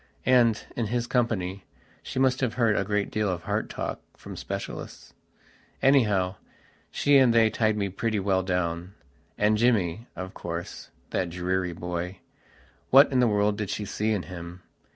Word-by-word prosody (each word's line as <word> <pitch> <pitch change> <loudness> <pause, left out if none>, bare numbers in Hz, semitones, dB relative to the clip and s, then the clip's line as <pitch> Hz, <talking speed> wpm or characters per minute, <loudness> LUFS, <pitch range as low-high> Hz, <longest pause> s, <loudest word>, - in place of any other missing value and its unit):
And, 120 -4 +4
in 115 -3 -1
his 120 +2 -1
company, 100 -7 -1 0.4
she - - -7
must 130 -1 +2
have 125 -4 0
heard 115 -4 +3
a - - +1
great 105 0 -1
deal 105 -1 0
of 90 -2 -3
heart - - -2
talk - - -4 0.2
from - - -9
specialists. - - -7 0.7
Anyhow, 105 -9 +3 0.5
she 145 -1 +4
and 130 -3 +5
they 115 -1 +4
tied 110 0 +1
me 100 -1 0
pretty 105 +3 -1
well 95 -1 +1
downand 90 0 -2 0.6
Jimmy, 110 -2 +1
of 95 +2 -6
course, 85 0 -6 0.2
that 90 - -1
dreary 90 +1 -1
boywhat 90 - 0
in 130 - +2
the 125 - +4
world 105 0 +1
did 105 -3 -3
she 105 - -3
see 105 +2 -1
in 100 -4 0
him? 90 0 -9
105 Hz, 155 wpm, -26 LUFS, 90-115 Hz, 0.7 s, and